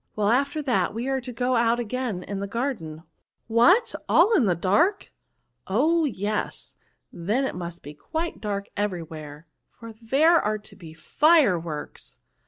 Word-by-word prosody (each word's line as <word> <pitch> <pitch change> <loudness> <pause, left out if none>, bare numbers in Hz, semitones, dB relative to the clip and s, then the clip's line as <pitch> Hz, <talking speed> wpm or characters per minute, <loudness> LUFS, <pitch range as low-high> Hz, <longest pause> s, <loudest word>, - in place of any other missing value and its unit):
Well, 210 -1 +1
after 280 +5 +1
that 255 -5 0
we 235 +3 -3
are 270 -1 -1
to 250 0 -7
go 250 +2 0
out 235 0 +2
again 240 -5 -3
in 200 +1 -5
the 200 - -4
garden.'* 195 - -4 0.3
" - - -53
What! 385 - +5 0.2
aU 395 +7 +5
in 265 - +3
the 180 -3 +2
dark?*' 305 - +1 0.3
" - - -49
Oh! 310 - +2
yes, 210 -5 -3 0.4
then 210 +11 -1
it - - -3
must 175 -1 -7
be 145 - -9
quite 320 - -5
dark 200 -2 -3
every 200 -4 -2
where, 155 -1 -10 0.3
for 230 -1 -9
there 275 +10 +3
are 215 +1 -1
to 210 - -13
be 165 -4 -12
fireworks." 175 - +1
225 Hz, 170 wpm, -25 LUFS, 180-270 Hz, 0.4 s, What